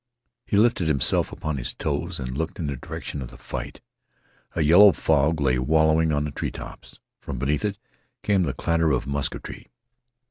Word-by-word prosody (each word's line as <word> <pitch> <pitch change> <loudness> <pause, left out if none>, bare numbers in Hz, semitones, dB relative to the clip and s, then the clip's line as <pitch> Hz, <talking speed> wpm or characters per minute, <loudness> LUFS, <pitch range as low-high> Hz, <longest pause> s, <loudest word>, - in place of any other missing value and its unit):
He 100 - +1
lifted 105 -6 +3
himself 70 -4 +1
upon 80 -2 -4
his 65 0 -3
toes - - -2
and 65 -1 -5
looked 80 +2 -3
in 85 - -3
the 70 -1 -2
direction 70 +3 -6
of 60 - -6
the - - -14
fight. - - -7 0.7
A 80 - +1
yellow 90 +6 +7
fog 75 0 +2
lay 65 -3 +2
wallowing 80 +4 +3
on 75 -1 +1
the 75 - -3
treetops. - - -7 0.2
From 70 - -6
beneath 70 +4 0
it 100 -2 -1 0.5
came 100 -2 +2
the 75 -7 -1
clatter 80 -1 +1
of 65 -2 0
musketry. 70 -1 -4
75 Hz, 175 wpm, -24 LUFS, 70-80 Hz, 0.7 s, yellow